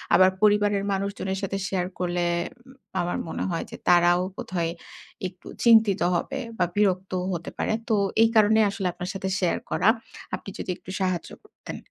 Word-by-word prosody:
আবার 185 0 +7
পরিবারের 205 -1 +3
মানুষজনের 195 -1 -2
সাথে 195 0 -1
শেয়ার 180 -2 -1
করলে, 175 -1 0 0.4
উম 260 - -14 0.3
আমার 175 0 -1
মনে - - -3
হয় 165 - -2
যে - - -7
তারাও 175 0 +5 0.2
বোধহয় 170 -2 -2 0.6
একটু 180 0 -14 0.2
চিন্তিত 220 -4 +6 0.2
হবে, 170 - -2 0.2
বা 180 - +4
বিরক্তও 185 -2 +1
হতে 170 -1 -5
পারে। - - 0 0.2
তো 220 - +4 0.3
এই 225 - +5
কারণে 220 0 +5
আসলে 195 -2 -2
আপনার 180 +1 -5
সাথে 190 -1 -3
শেয়ার 180 -3 +1
করা। 205 - +4 0.5
আপনি - - -9
যদি - - -5
একটু - - -15
সাহায্য 185 -2 -1
করতেন? 425 - -9
190 Hz, 165 wpm, -25 LUFS, 180-205 Hz, 0.6 s, আবার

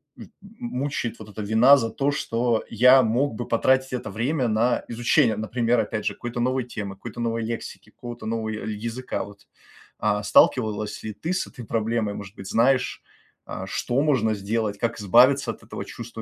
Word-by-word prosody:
м - - -12
мучает 165 - -4
вот 110 -1 -11
эта 105 - -7
вина 110 +7 +6
за 115 -4 0
то, 140 +5 0
что 120 -4 0
я 125 +4 +6
мог 120 +3 +1
бы 120 +2 -5
потратить 130 +3 +2
это 125 - -4
время 125 +3 0
на 115 +3 +1
изучение, 115 -2 +2
например, 115 +2 0
опять 110 0 -2
же, - - 0
какой-то 120 0 -6
новой 130 0 0
темы, 100 -5 -6
какой-то 120 +4 -9
новой 115 -1 -1
лексики, 115 +1 -6
какого-то 120 -2 -9
нового 110 -1 -2
я 110 -1 -4
языка. 115 +4 -4
Вот. 100 0 -14 0.5
А, 105 -1 0
сталкивалась 105 -1 +2
ли 110 -1 -5
ты 170 +3 -3
с 190 - -1
этой 125 -4 -10
проблемой? 110 -1 -1
Может 100 +1 -9
быть, 95 -1 -9
знаешь, 125 +4 +2 0.5
а, - - -5
что 125 +3 -1
можно 120 -8 +2
сделать? 105 +1 -2
Как 115 0 -2
избавиться 125 +6 +5
от - - -13
этого 110 - -7
чувства 115 -1 -8
115 Hz, 180 wpm, -24 LUFS, 110-125 Hz, 0.5 s, вина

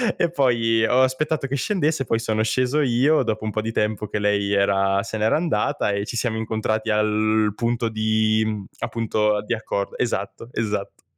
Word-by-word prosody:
E 170 - +1
poi, 115 -6 +2
ho 125 +3 +3
aspettato 135 +3 0
che 140 +1 -2
scendesse, 155 -4 0
poi 115 - +1
sono 110 -1 0
sceso 130 +5 +1
io 135 +4 +3
dopo 110 0 -2
un 110 - -2
po' 110 - -2
di 115 +1 -3
tempo 105 -1 -1
che 105 - -3
lei 100 -1 +1
era 100 0 +2
se 110 - -5
n'era 110 +1 +2
andata 155 -7 0
e 100 0 -2
ci 120 - -6
siamo 115 -2 -1
incontrati 110 0 -2
al 105 0 +2
punto 115 0 -1
di 110 0 +1
mhmm, 105 -3 -3
appunto, 105 -2 0
di 120 - -2
accor 100 -3 -3
esatto, 115 -1 -3
esatto. 105 -3 -3
110 Hz, 185 wpm, -22 LUFS, 105-125 Hz, -, ho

